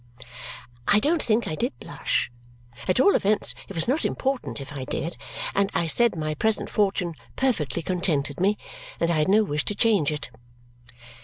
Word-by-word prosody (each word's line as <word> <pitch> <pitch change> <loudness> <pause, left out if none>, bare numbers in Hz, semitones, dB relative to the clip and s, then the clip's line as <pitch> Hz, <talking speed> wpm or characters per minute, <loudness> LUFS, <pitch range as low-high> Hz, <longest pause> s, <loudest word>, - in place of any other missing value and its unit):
I 205 - +6
don't 310 +7 +2
think 225 +1 +1
I - - -2
did 245 - -2
blush - - -1 0.6
at 185 - +2
all 400 +9 +6
events, 210 +1 +2 0.2
it 195 - -8
was 165 - +1
not 275 +6 +1
important 265 - -1
if 140 +1 -8
I 135 -2 -5
did 160 +6 -3 0.4
and 200 0 +2
I 165 - +2
said 235 +7 +3
my 155 -1 -2
present 220 +8 0
fortune 195 -4 +1 0.2
perfectly 170 - 0
contented 155 -6 0
me 200 +3 +2 0.4
and 170 0 +2
I 160 - +2
had 150 - +2
no 215 +2 +5
wish 150 -6 -1
to 205 - -2
change 200 -9 +3
it. 145 -4 -5
185 Hz, 175 wpm, -25 LUFS, 155-220 Hz, 0.6 s, I